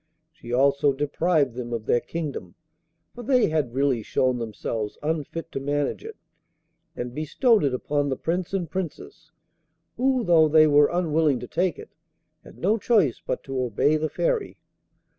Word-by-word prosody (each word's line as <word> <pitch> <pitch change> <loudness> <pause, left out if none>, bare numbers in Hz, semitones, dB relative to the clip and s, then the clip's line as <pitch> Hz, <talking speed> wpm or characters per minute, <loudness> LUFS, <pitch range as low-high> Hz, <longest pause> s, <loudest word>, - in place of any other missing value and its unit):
She 155 -8 -11
also 140 +3 +3
deprived 145 0 0
them 120 -1 -6
of 115 -2 -4
their 120 - +3
kingdom, 135 - -6 0.6
for 245 - -9
they 250 -3 +2
had 150 -6 -1
really 135 -3 +1
shown 130 +3 0
themselves 110 -1 -4
unfit 160 +1 -3
to - - -3
manage 145 - -2
it, 445 0 -9 0.8
and 120 0 -5
bestowed 205 - +2
it 140 - +2
upon 145 +2 -1
the 130 - -1
Prince 175 +2 -2
and 190 -3 -2
Princess, 160 -2 -7 0.7
who, 260 0 +1
though 165 -5 +5
they 155 +1 +6
were 145 -1 +5
unwilling 160 -6 +1
to 125 - -7
take 180 +2 -1
it, - - -11 0.5
had - - -15
no 210 +6 +1
choice 200 - +2
but - - -3
to 135 -1 -3
obey 125 +5 +1
the 155 0 -1
Fairy. - - -1
150 Hz, 160 wpm, -24 LUFS, 130-175 Hz, 0.8 s, they